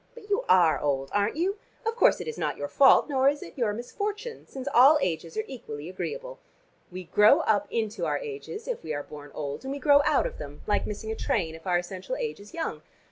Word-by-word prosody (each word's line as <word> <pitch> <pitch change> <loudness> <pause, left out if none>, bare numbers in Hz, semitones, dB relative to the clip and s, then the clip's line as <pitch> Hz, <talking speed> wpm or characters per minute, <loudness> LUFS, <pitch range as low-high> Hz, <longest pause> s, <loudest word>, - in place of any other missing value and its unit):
But 425 -3 -12
you 425 +5 +2
are 175 -4 +5
old, 135 -2 -1
aren't 205 +3 +1
you? 380 +6 -1 0.3
Of 450 0 0
course - - +4
it - - -6
is 465 - -4
not - - -1
your - - -3
fault, 275 -1 +6
nor 270 -2 +3
is 290 +1 -3
it - - -12
your 235 -5 0
misfortune, 415 - -5
since 265 0 -8
all 275 +5 +8
ages 165 - -3
are 215 - 0
equally 165 - -8
agreeable. - - -6 0.5
We 185 +1 -6
grow 210 +5 +5
up 205 -2 +1
into 220 -1 -2
our - - 0
ages 435 0 -7
if - - -3
we 155 -1 -3
are 145 - -4
born 145 0 -11
old, 145 - -5
and 265 - -4
we 280 - -3
grow 285 0 +5
out 300 -2 +2
of - - -5
them, 145 0 -9
like 205 - 0
missing 220 +1 -5
a - - -2
train, 170 -7 -1
if 165 +3 -11
our 180 -1 +3
essential 185 - -5
age 475 -3 -4
is 205 +1 -13
young. 330 - -4
230 Hz, 235 wpm, -27 LUFS, -, 0.5 s, all